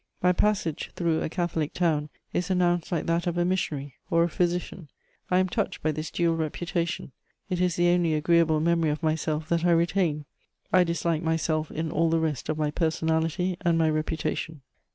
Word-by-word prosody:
My 180 - +4
passage 190 -4 0
through 165 -2 0
a - - -2
Catholic 165 -3 -2
town 155 -4 +1 0.2
is 180 +1 -1
announced 175 -2 +1
like 170 -4 -1
that 170 +1 0
of 175 0 -1
a 175 - +2
missionary 150 -7 -2
or 170 -2 +4
a 170 - +1
physician. 175 -1 -2 0.4
I 180 - +3
am 185 0 +3
touched 190 -2 -2
by 155 - +2
this 155 +1 -4
dual 170 -1 +1
reputation: 170 0 -2 0.4
it 180 -1 0
is 180 -2 +2
the 175 0 +3
only 175 -3 +2
agreeable 160 0 +3
memory 165 -1 +2
of 150 +2 -3
myself 155 0 -1
that 170 -1 +1
I 175 - +3
retain; 165 -3 +1 0.5
I 185 -1 +6
dislike 170 -1 -1
myself 160 -1 0
in 160 0 -3
all 165 +1 +2
the 165 - +2
rest 155 -5 -2
of 155 - 0
my 150 -1 0
personality 160 +2 0
and 170 -1 +2
my 160 -1 +3
reputation. 155 -1 -3
165 Hz, 190 wpm, -26 LUFS, 155-175 Hz, 0.5 s, I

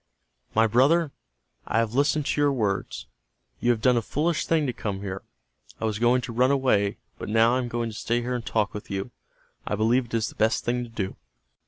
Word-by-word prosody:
"My 110 +1 +5
brother, 140 +8 +3 0.6
I - - 0
have 115 -1 +1
listened 145 +2 +2
to 145 - 0
your 145 -1 +4
words. 105 -7 -2 0.5
You 120 - 0
have 115 -3 +1
done 125 -1 +4
a - - +2
foolish 155 +7 -1
thing 160 -2 +2
to 125 - -1
come 100 -4 -4
here. 95 -1 -5 0.6
I - - -2
was 110 -1 -1
going 120 +2 +3
to 120 - -6
run 125 +3 +3
away, 125 -8 +2 0.2
but - - -5
now 115 +2 +4
I 130 - +2
am 125 - -2
going 120 -1 -2
to - - -10
stay 120 0 -1
here 125 +1 -3
and 120 -2 -3
talk 110 -2 0
with 105 - -8
you. 100 +4 -4 0.6
I - - 0
believe 115 +4 +2
it 115 - -16
is 115 -1 0
the - - -12
best 110 +2 +1
thing 125 +1 0
to 120 - -9
do." 100 -4 -4
120 Hz, 225 wpm, -26 LUFS, 110-130 Hz, 0.6 s, My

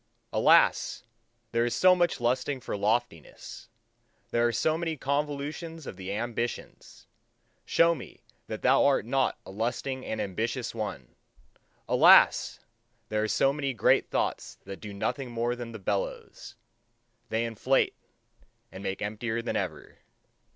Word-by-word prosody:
Alas! - - +4 0.5
there 115 0 +2
is 120 - -1
so 185 0 +6
much 175 -2 +1
lusting 125 +3 0
for 120 - -5
loftiness! 105 -5 -3 0.6
There 120 0 +3
are - - +1
so 155 +6 +1
many 165 -1 -3
convulsions 145 +3 -3
of - - -7
the 95 +1 -6
ambitions! 120 +2 -5 0.6
Show 170 0 +4
me 140 - -11 0.2
that 110 - -6
thou 130 +2 +5
art 140 -6 +3
not 130 +2 0
a - - -9
lusting 125 +5 -3
and 110 - -4
ambitious 115 +6 -2
one! 100 - -5 0.7
Alas! - - +6 0.5
there 105 0 0
are 110 - 0
so 135 +5 +2
many 140 -3 -2
great - - +3
thoughts - - -2
that 95 - -9
do 105 - -7
nothing 125 +6 -3
more 120 +1 -1
than 120 -1 -7
the 110 - -7
bellows: 100 0 -4 0.7
they 115 +1 0
inflate, 115 +4 +1 0.8
and 95 - -9
make 95 0 -3
emptier 110 +2 -3
than - - -3
ever. - - -4
120 Hz, 140 wpm, -28 LUFS, 110-135 Hz, 0.8 s, so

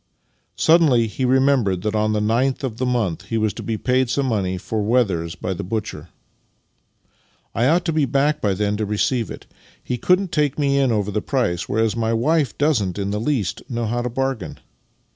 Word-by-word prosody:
Suddenly 155 -8 +4
he 115 +4 -3
remembered 125 -8 +2
that 105 0 -1
on 110 0 +1
the 105 - 0
9th 120 +6 0
of 120 -5 -3
the 130 +1 -1
month 115 -9 -1
he 115 - -4
v/as 110 -2 0
to - - -7
be 115 -1 -3
paid 130 +2 +1
some 135 +2 0
money 100 -7 -1
for 110 +4 -3
wethers 100 -8 0
by 95 - -3
the 95 - -5
butcher. 110 +4 -4 0.7
" - - -41
I 120 +4 +2
ought 170 +5 +2
to 165 - 0
be 155 -2 +2
back 145 +3 +1
by 100 -5 +1
then 105 +1 -1
to 110 - -1
receive 110 +3 0
it. - - -9 0.4
He 125 - -3
couldn't 180 +4 +2
take 150 -5 0
me 140 -2 +2
in 135 -3 +2
over 105 -2 0
the 105 - -1
price, 110 -11 -1
whereas 110 0 +1
my 115 -1 0
wife 140 +3 +1
doesn't 120 - +1
in 100 -1 -2
the 105 +1 -2
least 120 -7 -1
know 120 -2 -2
how 120 +2 -1
to 125 - -2
bargain. 135 -3 -3
115 Hz, 205 wpm, -21 LUFS, 105-135 Hz, 0.7 s, Suddenly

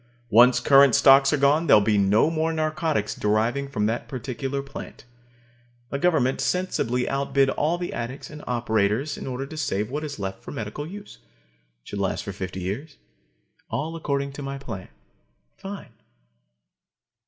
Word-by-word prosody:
Once 125 +3 +6
current 135 -1 +6
stocks 135 0 +6
are 150 - +2
gone, 145 +4 +3
there'll 105 - +7
be 105 +1 +2
no 105 +9 +3
more 160 0 0
narcotics 155 -8 -1
deriving 115 +6 0
from 105 -6 -1
that 115 +2 -2
particular 135 +2 -4
plant. 135 -2 -10 0.9
The 140 - -2
government 140 -6 +2
sensibly 125 -9 0
outbid 135 0 +1
all 160 +4 0
the 175 0 -4
addicts 120 +5 -6
and 150 0 -10
operators 115 +3 0
in - - -7
order 130 +1 -3
to 155 - -10
save 110 -7 -2
what 150 +2 -3
is 145 -2 -5
left 95 -1 -5
for - - -10
medical 115 +7 -5
use. 200 - -10 0.6
It - - -14
should 100 - -5
last 95 -2 -1
for 100 - -5
fifty 95 -1 -5
years. 115 - -5 0.7
All 160 +4 -3
according 140 -3 -2
to 145 - -7
my 135 0 -5
plan 110 -9 -7 0.7
fine! 195 - -9
135 Hz, 160 wpm, -24 LUFS, 110-150 Hz, 0.9 s, there'll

